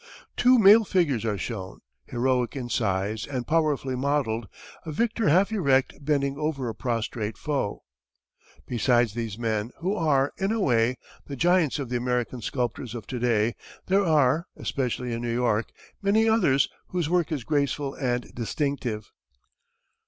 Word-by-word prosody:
Two 250 +1 +5
male 215 +1 +8
figures 150 - +1
are 105 -2 0
shown, 95 -1 -6 0.2
heroic 125 +1 0
in 125 -3 -4
size 105 -2 -1
and 130 -3 -3
powerfully 150 -5 +1
modelled, 125 -5 -1 0.4
a 160 - -6
victor 230 +4 +1
half 190 +7 +4
erect 140 -11 +2
bending 140 -1 0
over 150 -4 -2
a 115 - -3
prostrate 115 -3 -3
foe. 140 -9 -2 0.8
Besides 120 -2 +2
these 115 -3 -4
men, 110 -2 -1
who 185 +4 -1
are, 145 -6 +2
in 195 +2 0
a 225 - 0
way, 125 - +2 0.3
the 140 - -5
giants 170 0 +2
of 140 -4 -4
the 125 - 0
American 125 0 -2
sculptors 120 0 -3
of 115 -4 -6
to 125 - -5
day, 115 -2 +2 0.3
there 195 +2 +3
are, 155 -1 +3
especially 125 -2 -2
in 115 - -3
New 120 -1 -2
York, 115 -3 +1 0.3
many 215 +3 +3
others 145 - +3 0.2
whose 175 -4 -1
work 175 -1 +1
is 145 -6 -2
graceful 140 0 -1
and 125 -2 -2
distinctive. 120 -1 -3
130 Hz, 150 wpm, -26 LUFS, 120-155 Hz, 0.8 s, male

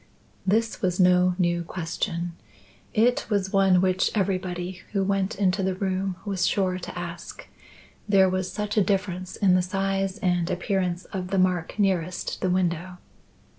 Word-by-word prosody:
This 225 +3 +1
was 180 -1 0
no 180 0 +4
new 175 -2 +1
question. 170 0 -3 0.6
It 240 +2 +2
was 200 -3 0
one 190 -2 +5
which 185 0 +2
everybody 185 -2 -2
who 195 -2 +1
went 195 0 0
into 195 -1 +1
the 190 -1 0
room 190 0 -1
was 190 -3 0
sure 185 -2 0
to 180 - -7
ask, 175 +2 -7 0.6
there 195 -2 +6
was 185 0 -1
such 210 +1 -3
a 210 - +6
difference 185 -2 -2
in 190 -3 +3
the 185 - +4
size 195 +1 -1
and 175 -2 0
appearance 185 -2 -1
of 185 -2 -3
the 195 +1 -1
mark 180 -2 +1
nearest 185 -4 -1
the 185 - +1
window. 180 0 -1
185 Hz, 155 wpm, -25 LUFS, 180-195 Hz, 0.6 s, there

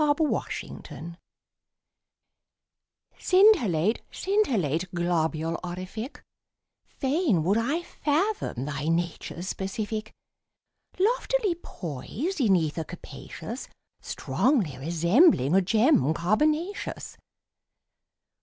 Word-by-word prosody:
_ 290 -1 +3
THE 320 - +2
LITTLE 300 - -3
STAR 170 +1 -9 2.0
Scintillate, 240 - +4
scintillate, 190 - 0
globule 165 -1 0
orific, 185 - -6 0.6
Fain 270 - +1
would 200 +7 +2
I 290 +9 -1
fathom 310 - -1
thy 145 0 -3
nature's 170 +1 -2
specific. 215 +3 -3 0.9
Loftily 455 0 +2
poised 275 - -5
in 205 -6 +5
ether 160 -1 0
capacious, 195 - -8 0.3
Strongly 225 - 0
resembling 170 - +4
a 195 - +6
gem 215 - +3
carbonaceous. 305 - -1
205 Hz, 80 wpm, -27 LUFS, -, 2.0 s, a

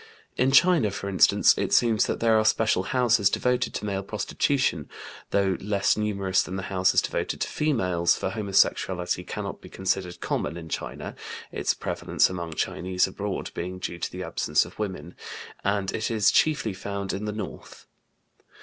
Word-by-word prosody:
In 130 +1 +2
China, 155 - +5
for 100 0 -5
instance, 95 - +5
it - - -1
seems 115 -3 +3
that - - -2
there 115 -1 +3
are - - +2
special 110 -3 +2
houses 120 -6 +3
devoted 125 +3 0
to - - -3
male 100 -1 -2
prostitution, 110 +7 -1 0.4
though 100 -2 +1
less 100 0 +1
numerous 100 -3 0
than 95 - -5
the 95 - -4
houses 95 0 +3
devoted - - -2
to - - 0
females, 90 - +1
for 95 - -3
homosexuality 95 -3 +1
cannot - - -6
be - - -12
considered 90 -2 -2
common 80 +3 -2
in 80 -2 -9
China - - -5 0.4
(its - - 0
prevalence - - 0
among 85 -3 -5
Chinese 90 +3 0
abroad 100 +1 -4
being 90 +2 -5
due 85 -1 -5
to - - -3
the - - -6
absence 75 - +1
of 85 - -14
women) 95 -4 -4 0.5
and 100 -1 0
it 110 - -2
is 110 -4 +3
chiefly 145 -9 +2
found 100 0 -4
in 100 +2 -4
the 105 - -2
north. 105 +1 -8
100 Hz, 165 wpm, -26 LUFS, 95-110 Hz, 0.5 s, China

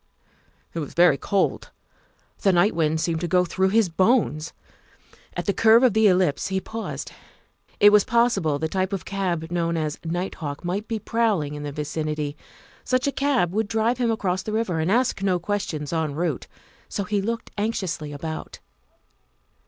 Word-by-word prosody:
It 165 - -3
was 150 - -6
very 170 -5 +5
cold. 195 -2 0 0.7
The 195 - +3
night 180 +4 +3
wind 160 -1 +1
seemed 165 0 -1
to 175 - -1
go 180 +1 +3
through 190 +2 +1
his 220 0 +3
bones. 175 - +1 0.9
At - - -2
the 200 - +1
curve 225 +4 +5
of 250 -5 +5
the 220 0 +5
ellipse 180 -6 +2
he 190 0 -1
paused; 225 +3 -6 0.7
it 205 0 +8
was 210 -1 +6
possible 225 -11 +2
the 160 +2 -1
type 190 +3 -1
of 195 - -3
cab 175 -4 -2
known 170 -1 0
as 155 -2 -2
night 175 +3 -2
hawk 145 +2 -5
might 195 +5 -2
be 225 - -2
prowling 210 -9 0
in 145 - -6
the 145 0 -4
vicinity. 150 0 -3 0.5
Such 255 0 +1
a 280 - +1
cab 270 -12 +1
would 220 +1 0
drive 225 +3 0
him 240 -2 +1
across 190 -5 0
the 215 - -5
river 215 -7 0
and 160 +4 0
ask 240 -2 +1
no 190 -2 +2
questions 170 -5 -3
en 160 -3 -1
route, 160 -4 -2 0.4
so 200 - -2
he 205 +1 -1
looked 230 +3 -4
anxiously 190 -8 -2
about. 155 +2 -6
185 Hz, 175 wpm, -24 LUFS, 160-215 Hz, 0.9 s, it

